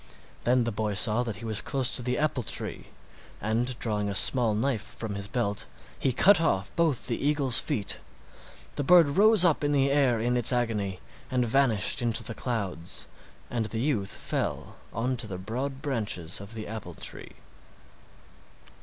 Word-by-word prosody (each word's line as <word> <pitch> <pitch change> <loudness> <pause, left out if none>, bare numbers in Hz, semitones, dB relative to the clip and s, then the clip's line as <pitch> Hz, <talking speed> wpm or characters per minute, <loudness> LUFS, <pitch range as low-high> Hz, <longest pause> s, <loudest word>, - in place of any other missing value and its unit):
Then 125 0 +3
the 115 - -2
boy 105 -1 -2
saw 110 +3 +5
that 115 -4 -4
he 115 - -9
was 110 -2 -1
close 135 -3 -1
to - - +1
the 125 +1 -2
apple 150 -3 0
tree, 110 - -4 0.5
and 115 +4 -1
drawing 105 -3 -1
a 100 - -3
small 115 0 +7
knife 115 0 -1
from 110 -3 -7
his 100 0 -5
belt 100 -2 -2 0.3
he 135 - +1
cut 180 - +5
off 95 - -1
both 160 -7 0
the 120 0 -3
eagle's 140 -4 +4
feet. 100 -3 -3 0.8
The 145 - -1
bird 170 0 +6
rose 205 +4 +5
up 160 -3 +2
in 145 0 +1
the 140 -1 +2
air 135 -5 +2
in 120 +2 0
its 120 0 +2
agony 105 -6 -1 0.3
and 125 -2 0
vanished 115 -5 +2
into 115 -1 -1
the 115 - -5
clouds, 100 -9 -2 0.4
and 115 -2 -2
the 110 +1 -5
youth 115 -7 -1
fell - - -4 0.2
on 125 +3 -2
to 115 - -1
the 95 -3 -6
broad 130 +8 -5
branches 105 - -2
of 100 +3 -9
the 110 -1 -6
apple 110 0 -8
tree. - - -6
120 Hz, 175 wpm, -27 LUFS, 105-135 Hz, 0.8 s, small